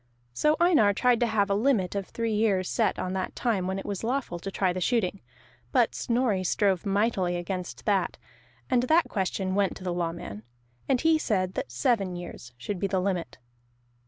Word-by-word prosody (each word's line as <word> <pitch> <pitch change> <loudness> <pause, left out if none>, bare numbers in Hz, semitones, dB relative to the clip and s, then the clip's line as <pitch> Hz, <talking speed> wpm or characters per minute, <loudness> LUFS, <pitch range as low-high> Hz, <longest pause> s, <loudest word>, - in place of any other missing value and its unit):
So 300 - +2
Einar 315 - +5
tried 250 0 +3
to 240 - +2
have 210 -3 +2
a - - +4
limit 210 -4 +2
of 200 -2 -3
three 230 -1 -2
years 205 -4 +2
set - - +1
on 185 - -3
that 190 -1 -3
time 205 -7 0
when 190 +1 -2
it 195 - -6
was 200 0 -4
lawful 245 -7 -2
to 195 - -5
try 190 -2 0
the 185 - -4
shooting; 200 -2 0 0.5
but - - +3
Snorri 235 -6 0
strove 195 +1 +1
mightily 195 -3 +1
against 180 +1 -5
that, 195 -4 +1 0.5
and 245 - +3
that 315 +7 +3
question 190 -1 -1
went 200 -1 +1
to - - -11
the 180 -1 -2
Lawman, 165 - -4 0.5
and 260 -3 +3
he 320 -1 +4
said 190 -9 0
that 265 +5 -4
seven 200 -9 +1
years 175 -8 -8
should 185 - -4
be 200 - 0
the 190 -1 0
limit. 180 -7 -2
200 Hz, 190 wpm, -27 LUFS, 185-235 Hz, 0.5 s, Einar